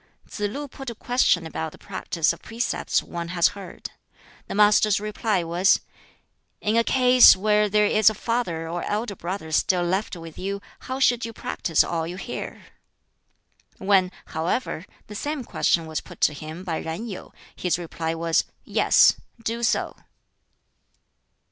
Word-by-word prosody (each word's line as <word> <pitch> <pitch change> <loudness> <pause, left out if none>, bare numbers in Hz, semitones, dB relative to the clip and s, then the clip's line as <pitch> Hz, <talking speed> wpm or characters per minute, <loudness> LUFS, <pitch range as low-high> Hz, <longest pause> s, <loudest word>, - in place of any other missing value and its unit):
Tsz - - -9
lu 285 +7 -5
put 270 -1 -8
a 235 - -7
question 245 -8 +2
about 160 0 -4
the - - -13
practice 175 -4 -1
of 170 - -13
precepts 230 +2 -1
one 170 -1 -5
has 170 0 +3
heard. 200 -2 -9 0.6
The - - -5
Master's 210 0 +5
reply 210 -2 -1
was, 175 +3 +3 0.8
"In 210 +2 0
a 230 - +4
case 250 0 +7
where 210 +2 +2
there 210 +1 +3
is 215 +1 +5
a 215 - -5
father 195 -8 -2
or 170 +1 -3
elder 210 0 -2
brother 170 -2 -5
still 175 +3 +2
left 190 +4 -1
with 165 -2 -10
you, 200 +2 -3 0.2
how 260 +1 -5
should 245 -3 +3
you 230 - -4
practise 165 -6 0
all 165 -1 -2
you 175 - -6
hear?" 220 - -6 1.1
When, 190 -2 +3
however, 170 +2 -2 0.2
the 210 - -10
same 290 +6 -3
question 170 -6 +1
was 160 -1 -3
put - - -14
to - - +4
him 155 +4 -8
by 170 -4 -2
Yen 165 +8 -5
Yu, 200 -6 -8 0.2
his 180 -2 0
reply 165 -1 -4
was, 165 0 +1 0.2
"Yes; - - +5 0.3
do 230 +1 -2
so." 235 - 0
195 Hz, 160 wpm, -24 LUFS, 170-225 Hz, 1.1 s, case